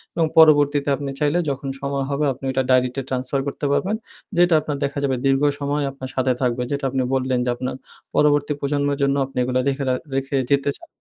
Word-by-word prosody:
এবং 165 Hz, -1 st, +2 dB
পরবর্তীতে 145 Hz, -2 st, +5 dB
আপনি 140 Hz, 0 st, -5 dB
চাইলে 150 Hz, +3 st, +2 dB
যখন 140 Hz, 0 st, -4 dB
সময় 140 Hz, -1 st, -2 dB
হবে 145 Hz, +1 st, 0 dB
আপনি 135 Hz, +2 st, -10 dB
ওটা 130 Hz, 0 st, 0 dB
ডায়রিতে 130 Hz, +1 st, +2 dB
transfer 130 Hz, +1 st, -1 dB
করতে 140 Hz, -, -4 dB
পারবেন। 160 Hz, +9 st, +1 dB, 0.4 s
যেটা 175 Hz, -1 st, +5 dB
আপনার 150 Hz, -1 st, -3 dB
দেখা 140 Hz, +1 st, -2 dB
যাবে 135 Hz, -2 st, +1 dB
দীর্ঘ 135 Hz, 0 st, +3 dB, 0.2 s
সময় 145 Hz, +1 st, -1 dB
আপনার 130 Hz, -1 st, -8 dB
সাথে 130 Hz, -1 st, +2 dB
থাকবে। 125 Hz, -1 st, 0 dB
যেটা 140 Hz, -1 st, -2 dB
আপনি 130 Hz, 0 st, 0 dB
বললেন, 130 Hz, -1 st, +1 dB
যে 125 Hz, -, 0 dB
আপনার 125 Hz, +1 st, -4 dB, 0.4 s
পরবর্তী 145 Hz, 0 st, +3 dB
প্রজন্মের 140 Hz, 0 st, 0 dB
জন্য 140 Hz, 0 st, +2 dB
আপনি 135 Hz, -, -12 dB
এগুলো 130 Hz, +1 st, 0 dB
লেখে 140 Hz, 0 st, 0 dB
রাখ 125 Hz, -, +1 dB, 0.2 s
রেখে 135 Hz, 0 st, -1 dB
যেতে 140 Hz, 0 st, +2 dB
চান। 335 Hz, -, -16 dB
140 Hz, 200 wpm, -22 LUFS, 130-145 Hz, 0.4 s, পরবর্তীতে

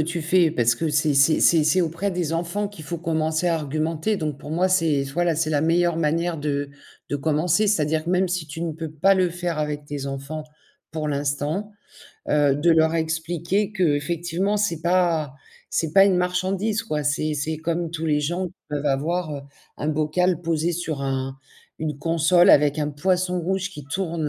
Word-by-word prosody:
tu 170 Hz, +3 st, -2 dB
fais 170 Hz, 0 st, +3 dB
parce 120 Hz, -6 st, +2 dB
que 165 Hz, +5 st, -2 dB
c'est 150 Hz, 0 st, +1 dB
c'est 140 Hz, +3 st, +4 dB
c'est 165 Hz, -3 st, +5 dB
c'est 155 Hz, +5 st, +3 dB
auprès 170 Hz, +4 st, -1 dB
des 175 Hz, -4 st, -2 dB
enfants 175 Hz, +5 st, -1 dB
qu'il 185 Hz, -7 st, -12 dB
faut 170 Hz, +3 st, -4 dB
commencer 160 Hz, 0 st, -1 dB
à 170 Hz, -, +2 dB
argumenter. 155 Hz, +6 st, -1 dB
Donc 155 Hz, -6 st, -3 dB
pour 145 Hz, -, -9 dB
moi, 180 Hz, +4 st, +1 dB
c'est 165 Hz, -6 st, +2 dB
voilà, 175 Hz, +1 st, +1 dB
c'est 155 Hz, -1 st, 0 dB
la 150 Hz, -2 st, +2 dB
meilleure 170 Hz, +2 st, +2 dB
manière 165 Hz, +1 st, 0 dB
de 145 Hz, -1 st, -2 dB, 0.4 s
de 145 Hz, -, -1 dB
commencer, 160 Hz, +7 st, +1 dB
c'est-à-dire 155 Hz, -6 st, +1 dB
que 170 Hz, -, -2 dB
même 185 Hz, +1 st, +2 dB
si 180 Hz, -3 st, -2 dB
tu 160 Hz, +3 st, -6 dB
ne 165 Hz, -, -2 dB
peux 160 Hz, 0 st, -6 dB
pas 155 Hz, +6 st, +3 dB
le 185 Hz, -1 st, +2 dB
faire 175 Hz, -1 st, -3 dB
avec 150 Hz, -1 st, -3 dB
tes 145 Hz, -1 st, -5 dB
enfants 140 Hz, +3 st, -5 dB, 0.5 s
pour 155 Hz, -1 st, -3 dB
l'instant. 145 Hz, +7 st, -2 dB, 0.6 s
Heu, 145 Hz, -2 st, +3 dB
de 150 Hz, +4 st, +2 dB
leur 160 Hz, 0 st, +4 dB
expliquer 165 Hz, +5 st, -1 dB
qu'effectivement, 175 Hz, +3 st, 0 dB
c'est 185 Hz, -6 st, 0 dB
pas 170 Hz, -5 st, +1 dB, 0.4 s
c'est 160 Hz, -2 st, -1 dB
pas 195 Hz, 0 st, +7 dB
une 195 Hz, -2 st, +3 dB
marchandise 185 Hz, +4 st, 0 dB
quoi, 155 Hz, -9 st, -2 dB
c'est 150 Hz, +1 st, 0 dB
c'est 155 Hz, +2 st, -2 dB
comme 165 Hz, +1 st, -2 dB
tous 165 Hz, -1 st, -4 dB
les 150 Hz, -1 st, +2 dB
gens 175 Hz, +5 st, -2 dB, 0.2 s
peuvent 150 Hz, 0 st, -3 dB
avoir, 155 Hz, +4 st, -1 dB
heu, -, -, -6 dB, 0.4 s
un 150 Hz, -, -2 dB
bocal 155 Hz, +3 st, +1 dB
posé 165 Hz, 0 st, 0 dB
sur 160 Hz, -4 st, -3 dB
un 135 Hz, 0 st, -2 dB, 0.4 s
une 150 Hz, -3 st, -3 dB
console 165 Hz, +3 st, +4 dB
avec 145 Hz, +1 st, +4 dB
un 150 Hz, -1 st, -1 dB
poisson 180 Hz, +4 st, 0 dB
rouge 190 Hz, +2 st, -2 dB
qui 150 Hz, -7 st, -10 dB
tourne, 165 Hz, 0 st, -2 dB
160 Hz, 190 wpm, -23 LUFS, 150-175 Hz, 0.6 s, pas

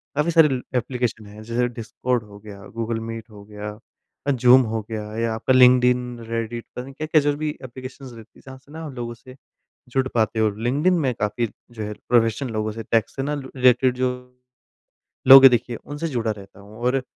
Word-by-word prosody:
काफ़ी 150 Hz, +4 st, +1 dB
सारी 150 Hz, -6 st, +4 dB
एप्लीकेशन 120 Hz, -2 st, -2 dB
हैं 105 Hz, +1 st, -12 dB
जैसे 120 Hz, +2 st, 0 dB
डिस्कॉर्ड 120 Hz, +1 st, -3 dB
हो 105 Hz, -1 st, -14 dB
गया, 100 Hz, -1 st, -11 dB
गूगल 115 Hz, 0 st, -2 dB
मीट 115 Hz, 0 st, -7 dB
हो 105 Hz, -2 st, -13 dB
गया, 105 Hz, 0 st, -8 dB, 0.5 s
ज़ूम 125 Hz, 0 st, +6 dB
हो 110 Hz, 0 st, -2 dB
गया 110 Hz, -1 st, -4 dB
या 115 Hz, 0 st, 0 dB
आपका 115 Hz, +4 st, 0 dB
लिंक्डइन, 125 Hz, -1 st, +4 dB
रेडिट 115 Hz, 0 st, -4 dB
पता 125 Hz, -, -5 dB
नहीं 135 Hz, +1 st, -11 dB
क्या-क्या 155 Hz, +2 st, +1 dB
जो 145 Hz, 0 st, +1 dB
भी 155 Hz, 0 st, -2 dB
एप्लिकेशंस 130 Hz, +1 st, -9 dB
रहती 115 Hz, -1 st, -14 dB
है -, -, -19 dB
जहाँ 130 Hz, -1 st, -10 dB
से 130 Hz, +2 st, -21 dB
ना 160 Hz, +1 st, -8 dB
हम 145 Hz, -, -8 dB
लोगों 120 Hz, -1 st, -5 dB
से 130 Hz, +2 st, -15 dB, 0.5 s
जुड़ 130 Hz, +1 st, 0 dB
पाते 110 Hz, -1 st, +1 dB
हो, 110 Hz, -1 st, +3 dB
लिंक्डइन 130 Hz, -, +1 dB
में 135 Hz, -5 st, +1 dB
काफ़ी 105 Hz, +3 st, -1 dB, 0.2 s
जो 115 Hz, -2 st, -7 dB
है 105 Hz, 0 st, -4 dB, 0.2 s
प्रोफेशनल 120 Hz, +2 st, +2 dB
लोगों 110 Hz, 0 st, -2 dB
से, 115 Hz, +1 st, -6 dB
टेक 115 Hz, 0 st, +1 dB
से 135 Hz, -, -5 dB
ना 145 Hz, +2 st, -2 dB
रिलेटेड 130 Hz, -2 st, +2 dB
जो 130 Hz, 0 st, +1 dB, 1.2 s
लोग 135 Hz, 0 st, +12 dB
है -, -, +13 dB
देखिए 120 Hz, 0 st, 0 dB
उनसे 145 Hz, +7 st, -6 dB
जुड़ा 120 Hz, -6 st, -1 dB
रहता 100 Hz, -1 st, -9 dB
हूँ। 105 Hz, +2 st, -14 dB
और 125 Hz, +2 st, 0 dB
120 Hz, 200 wpm, -22 LUFS, 110-130 Hz, 1.2 s, है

